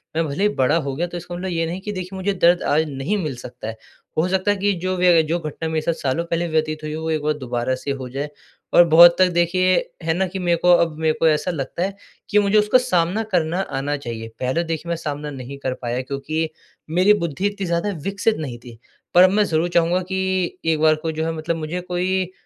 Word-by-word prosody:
मैं 165 0 +1
भले 145 +7 -2
ही 210 - +4
बड़ा 130 +3 +2
हो 140 -4 -3
गया 170 +5 -1
तो 175 - -6
इसका 175 +1 -7
मतलब 185 +2 -4
ये 165 -2 0
नहीं 170 +3 -4
कि 210 - -5
देखिए 185 -1 -6
मुझे 195 +2 -1
दर्द 175 -1 +3
आज 155 +2 +2
नहीं 140 +9 -2
मिल 150 -4 -3
सकता 120 -2 -9
है। 110 0 -6 0.4
हो 160 +3 +2
सकता 190 +2 +1
है 205 - 0
कि 200 +1 +1
जो 185 0 0
व्यय 180 -2 +5
जो 170 +2 +1
घटना 160 0 -5
मेरे 160 -1 -1
साथ 170 - 0
सालों 135 +5 0
पहले 170 0 -1
व्यतीत 155 -1 -1
हुई 155 - -4
है 155 - -4
वो 160 0 -4
एक 155 -1 0
बार 150 0 +1
दोबारा 125 -1 -2
से 135 +2 -4
हो 135 -2 -5
जाए। 140 +4 -4 0.4
और 175 - +8
बहुत 170 +2 +8
तक 185 - +6
देखिए 185 +2 +3 0.3
है 160 0 +1
न 190 - +2
कि 190 +1 -5
मेरे 175 -2 +1
को 180 +2 +3
अब 165 -2 0
मेरे 160 -1 +2
को 165 - +4
ऐसा 155 +3 +1
लगता 155 +2 -3
है 195 +1 -3 0.3
कि 210 - +4
मुझे 205 +1 +3
उसका 210 +4 +4
सामना 200 -4 +1
करना 170 0 +1 0.2
आना 145 +2 -2
चाहिए। 115 -4 -6
पहले 130 +7 0
देखिए 165 0 -4
मैं 170 - 0
सामना 150 -2 -5
नहीं 135 0 -8
कर 130 - 0
पाया 120 +1 -2
क्योंकि 155 +4 -3 0.5
मेरी 200 +3 +6
बुद्धि 165 +4 -3
इतनी 205 -1 -4
ज़्यादा 170 +3 0
विकसित 200 +3 0
नहीं 135 -6 -5
थी। 120 -1 -13 0.4
पर 180 - +8
अब 185 - +7
मैं 210 +1 +3
ज़रूर 165 -1 0
चाहूँगा 175 +1 +2
कि 190 -1 -1
एक 160 -1 +2
बार 155 0 +5
कोई 160 -1 -2
जो 160 +1 -2
है 165 - -1
मतलब 160 +1 -2
मुझे 160 +3 -4
कोई 180 +1 -1
165 Hz, 250 wpm, -21 LUFS, 150-185 Hz, 0.5 s, और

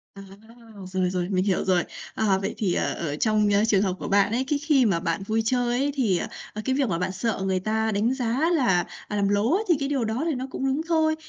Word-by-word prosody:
À, 195 - -9 0.7
rồi, 185 -1 +1
rồi, 180 0 -2
mình 185 -1 +1
hiểu 190 -3 +1
rồi. 180 -2 +2 0.3
Ờ, 200 -3 +2
vậy 195 - -3
thì, 190 -5 0
ờ, - - 0
ở 150 -3 -3
trong 215 +3 +2 0.2
trường 200 -3 +3
hợp 190 -3 0
của - - -5
bạn 200 +1 +3
ấy, 250 +3 0
cái 290 -1 0
khi 290 -5 +3
mà 180 -5 +2
bạn 175 +2 -2
vui 220 +1 +1
chơi 245 0 +1
ấy 285 +1 +1
thì, 215 -10 +2
ờ, - - -3 0.3
ờ, 215 - -5
cái 260 0 +1
việc 270 -6 +1
mà 170 - 0
bạn 180 +1 -1
sợ 200 +1 -2
người 190 -1 +1
ta 220 +2 0
đánh 220 +5 +1
giá 260 +5 0
là 190 - +2 0.2
làm 205 -1 0
lố 205 +8 +2
ấy 430 - 0
thì 340 - +6
cái 275 0 -2
điều 265 -5 0
đó 225 +7 -2
thì 320 -5 0
nó 260 +1 -4
cũng 270 - -3
đúng 275 +4 0
thôi. 315 -2 +2
220 Hz, 260 wpm, -25 LUFS, 190-265 Hz, 0.7 s, thì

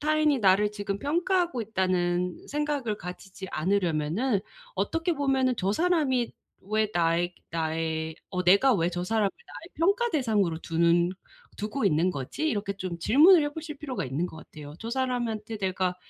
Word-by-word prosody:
'타인이 305 -1 +2
나를 205 0 +4
지금 205 -1 -4
평가하고 345 - 0
있다.'는 180 -4 -1
생각을 290 -7 -1
가지지 190 +1 -8
않으려면은 185 - 0 0.3
어떻게 330 +1 0
보면은 270 -3 +1
'저 195 0 0
사람이 295 -6 +1 0.3
왜 215 +2 0
나의 175 +1 +1 0.2
나의 160 0 -2
어 180 -1 -3
내가 200 +8 +5
왜 170 -2 +1
저 175 0 -3
사람을 210 +1 +1
나의 350 - -13
평가 400 +8 +2
대상으로 210 - +1
두는 170 +1 +2 0.5
두고 215 +5 -2
있는 170 0 +3
거지?' 155 - -3
이렇게 205 -7 -1
좀 185 -3 -4
질문을 305 - +6
해보실 300 +1 -5
필요가 275 -3 -4
있는 140 +7 -2
것 170 - -11
같아요. 150 -2 -11
저 225 - -6
사람한테 235 -4 -2
내가 185 -2 -1
205 Hz, 335 characters per minute, -27 LUFS, 175-275 Hz, 0.5 s, 질문을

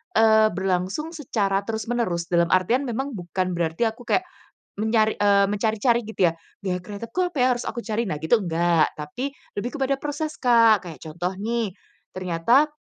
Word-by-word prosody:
eee, 220 -1 +5
berlangsung 190 - -2
secara 205 -9 -1
terus-menerus 220 -5 -2
dalam 170 -1 +2
artian 205 +9 +3
memang 265 +4 -3
bukan 185 0 -2
berarti 165 +4 -1
aku 235 +2 -12
kayak, 370 - +2 0.6
menyari 220 0 +2
eee, 200 -1 +5
mencari-cari 220 +3 +1
gitu 190 -6 +2
ya. - - -11 0.3
Gaya 180 -2 -1
kreatifku 210 - -7
apa 350 - -8
ya, - - +5
harus 245 -1 -2
aku 235 - -4
cari. 225 +1 -2
Nah 185 - -2
gitu 190 +9 +3
enggak, 170 -3 +2
tapi, 245 - -5 0.2
lebih 245 +7 -4
kepada 275 -1 0
proses, 295 +2 -4
Kak. 230 -6 +5
Kayak 160 - -9
contoh 175 +4 -3
nih, 220 -1 -2 0.4
ternyata, 185 - +2
215 Hz, 165 wpm, -24 LUFS, 180-240 Hz, 0.6 s, eee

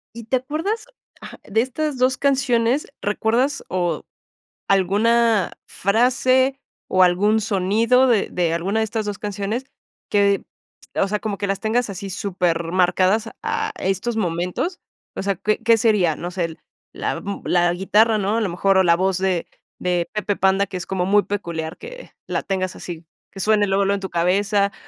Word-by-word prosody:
¿Y 230 -1 -8
te 255 +3 +1
acuerdas, 325 - -3 0.4
ajá, - - -10
de 220 +2 +1
estas 285 +3 -2
2 255 +1 +2
canciones? 265 -1 +1
¿Recuerdas 235 +7 0
o 175 -4 -2 0.6
alguna 210 +2 +3
frase 255 +5 +2 0.3
o 185 0 +4
algún 200 +5 +3
sonido 220 +5 +2
de 230 -5 +2
de 170 -2 0
alguna 195 +6 0
de - - +2
estas 220 0 -3
2 205 -1 -3
canciones 205 +5 -3 0.4
que, 200 -1 +2 0.5
o 195 - +2
sea, 210 +1 -1
como 205 -2 -3
que 200 - -2
las 195 0 -2
tengas 225 +1 0
así 195 0 -6
supermarcadas 185 +2 +1
a 445 -1 -1
estos 195 +5 -1
momentos? 180 - -2 0.3
O - - -4
sea, 200 0 0
¿qué 210 +4 0
qué 230 0 +5
sería? 205 -8 +2
No 175 - -5
sé 180 -1 -2
el 165 -1 -8 0.3
la - - -2
m 200 0 -5
la 175 -1 +3
guitarra, 215 +5 +3
¿no? 205 +1 0
A 230 - +1
lo 205 - 0
mejor 195 +3 +2
o 190 - +5
la 170 -2 +5
voz 190 0 +1
de 185 -2 0 0.3
de 180 -1 0
Pepe 210 -1 -1
Panda, 195 +1 +2
que 185 - -9
es 180 -1 -4
como 185 -2 -1
muy 205 +2 +4
peculiar 170 -5 -4
que - - -10 0.2
la - - -2
tengas 185 -1 -2
así, 170 -2 -8 0.3
que 195 - -10
suene 210 +1 +3
luego, 195 0 +2
luego 200 +1 +2
en 200 - -4
tu 190 - -5
cabeza, 200 +4 +1
200 Hz, 175 wpm, -21 LUFS, 185-230 Hz, 0.6 s, qué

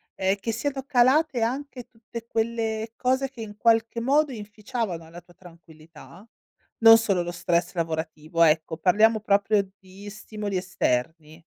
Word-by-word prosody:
ehm, 190 +1 +1
che 225 - -2
siano 270 +3 -3
calate 265 +1 +3
anche 255 +1 -3
tutte 230 0 -10
quelle 225 -1 -2
cose 260 +1 0
che 255 -3 -17
in 210 -1 -8
qualche 230 +1 +1
modo 280 +2 +2
inficiavano 210 -5 -5
la 175 +1 -11
tua 175 -1 -22
tranquillità? 165 +2 -16 0.5
Non 225 0 +9
solo 200 -6 0
lo 175 - -5
stress 175 0 -1
lavorativo, 160 -1 -4
ecco, 160 0 +1
parliamo 215 +6 +3
proprio 205 -1 +1
di 195 +2 -13
stimoli 210 -1 -6
esterni. 160 -2 -2
210 Hz, 140 wpm, -25 LUFS, 175-230 Hz, 0.5 s, Non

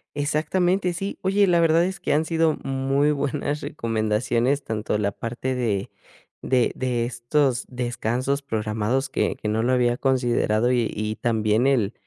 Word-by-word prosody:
Exactamente, 175 +5 0
sí. 195 +4 -5
Oye, 195 +2 +3
la 175 -2 +3
verdad 165 0 +4
es 190 +1 -4
que - - -1
han 155 +2 +2
sido 165 -1 +1
muy 135 +2 +1
buenas 145 +1 -2
recomendaciones, 115 +4 0
tanto 105 -1 -2
la 100 -1 0
parte 120 +5 -4
de 110 -6 -1 0.5
de 125 -3 +2
de 125 -2 -1
estos 125 +2 0
descansos 125 +2 -2
programados 110 +1 -1
que - - 0
que 105 - -4
no 110 +1 0
lo 125 +3 +1
había 120 -1 +2
considerado 120 -3 +1
y 120 -3 +1
y 110 +1 -3
también 110 +1 +1
el 120 -6 +2
125 Hz, 155 wpm, -24 LUFS, 115-145 Hz, 0.5 s, verdad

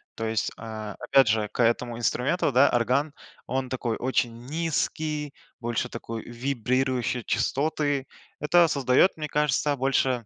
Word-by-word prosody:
То 115 - -4
есть, 110 0 0
а, 110 -2 -7
опять 130 0 +4
же 105 -1 +1
к - - -2
этому 120 0 +1
инструменту, 125 +5 0
да, 130 +3 +6
орган, 130 +5 +1 0.3
он 130 0 -1
такой 125 -3 -2
очень 120 -2 -1
низкий, 155 -1 -2 0.3
больше 120 +1 -2
такой 115 -1 -6
вибрирующий 125 0 -1
частоты. 140 +3 0 0.3
Это 165 +3 +4
создаёт, 135 +5 +4
мне 155 -1 -3
кажется, 150 0 +1
больше, 130 -2 +1
130 Hz, 135 wpm, -26 LUFS, 115-145 Hz, 0.3 s, да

